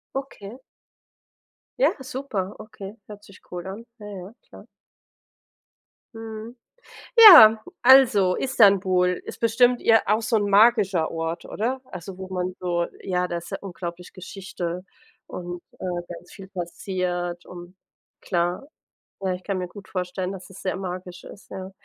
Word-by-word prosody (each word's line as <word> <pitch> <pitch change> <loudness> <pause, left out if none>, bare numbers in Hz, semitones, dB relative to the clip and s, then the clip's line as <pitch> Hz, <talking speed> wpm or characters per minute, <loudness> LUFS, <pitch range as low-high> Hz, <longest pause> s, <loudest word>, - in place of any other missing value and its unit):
Okay. 260 -3 -7 1.2
Ja, - - +4
super, 245 -8 -4
okay. 205 -1 -10
Hört 210 -1 -11
sich 200 - -17
cool 180 +1 -6
an. 200 +5 -8
Ja, 210 - -10
ja. 195 0 -9 0.2
Klar. - - -14 1.5
Mhm, 225 +1 -8 0.6
ja, 225 - +10 0.2
also, 235 -8 +6
Istanbul 190 -7 +3
ist - - -9
bestimmt 240 +2 +3
ir 225 -1 +4
auch 215 +2 +2
so 225 +1 0
'n 205 -1 0
magischer 200 -5 +4
Ort, 165 +1 -4
oder? 250 +5 -3
Also, 185 +1 -9
wo 190 - -7
man 185 -1 -3
so 175 -1 -1 0.2
ja, 180 -1 -1
da 175 -1 -3
ist 170 - -11
ja - - -3
unglaublich 175 -2 -7
Geschichte 185 -1 -6 0.4
und, 175 -1 -7 0.2
äh, - - -5 0.3
ganz 175 +1 -14
viel 195 -2 -11
passiert 175 -1 -4
und 175 0 -11 0.5
klar, 175 +9 -2 0.5
ja, 190 -1 -1
ich 180 - -8
kann 195 0 -3
mir 180 -1 -4
gut 200 +1 -13
vorstellen, 185 0 -3
dass 190 -1 -10
es 190 - -13
sehr 185 - -2
magisch 180 -1 -7
ist, 200 - -14
ja. 190 0 -7
190 Hz, 145 wpm, -24 LUFS, 180-215 Hz, 1.5 s, ja